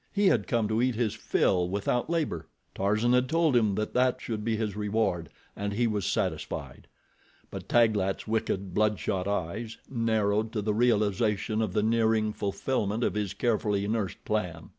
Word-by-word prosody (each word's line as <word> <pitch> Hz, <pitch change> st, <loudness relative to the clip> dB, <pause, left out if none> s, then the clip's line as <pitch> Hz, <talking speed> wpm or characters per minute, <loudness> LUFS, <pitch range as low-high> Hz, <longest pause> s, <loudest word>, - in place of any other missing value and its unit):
He 205 Hz, 0 st, +1 dB
had 115 Hz, -, +1 dB
come 115 Hz, -3 st, +1 dB
to 110 Hz, +2 st, +1 dB
eat 125 Hz, -1 st, +1 dB
his 110 Hz, -2 st, 0 dB
fill 90 Hz, -2 st, +1 dB
without 100 Hz, +7 st, -1 dB
labor—Tarzan 105 Hz, -, -1 dB
had 125 Hz, 0 st, +3 dB
told 160 Hz, -3 st, +2 dB
him 110 Hz, -5 st, +3 dB
that 105 Hz, +1 st, -2 dB
that 125 Hz, 0 st, +2 dB
should 110 Hz, -2 st, -4 dB
be 115 Hz, 0 st, 0 dB
his 105 Hz, -3 st, -2 dB
reward, 105 Hz, -6 st, -1 dB, 0.3 s
and 100 Hz, 0 st, -3 dB
he 120 Hz, +3 st, +1 dB
was 105 Hz, -5 st, -1 dB
satisfied. -, -, -3 dB, 0.6 s
But -, -, -8 dB
Taglat's 110 Hz, -5 st, +2 dB
wicked, 100 Hz, -4 st, -1 dB
bloodshot 105 Hz, -3 st, 0 dB
eyes, 100 Hz, +4 st, -3 dB
narrowed 110 Hz, -3 st, 0 dB
to 105 Hz, -3 st, -2 dB
the 105 Hz, 0 st, 0 dB
realization 110 Hz, -1 st, +1 dB
of 105 Hz, -5 st, -1 dB
the 105 Hz, -, +1 dB
nearing 110 Hz, -1 st, +2 dB
fulfillment 105 Hz, +2 st, -1 dB
of -, -, +1 dB
his 105 Hz, -2 st, -2 dB
carefully 105 Hz, -3 st, 0 dB
nursed 110 Hz, -3 st, -2 dB
plan. 90 Hz, -7 st, -2 dB
110 Hz, 160 wpm, -28 LUFS, 100-115 Hz, 0.6 s, had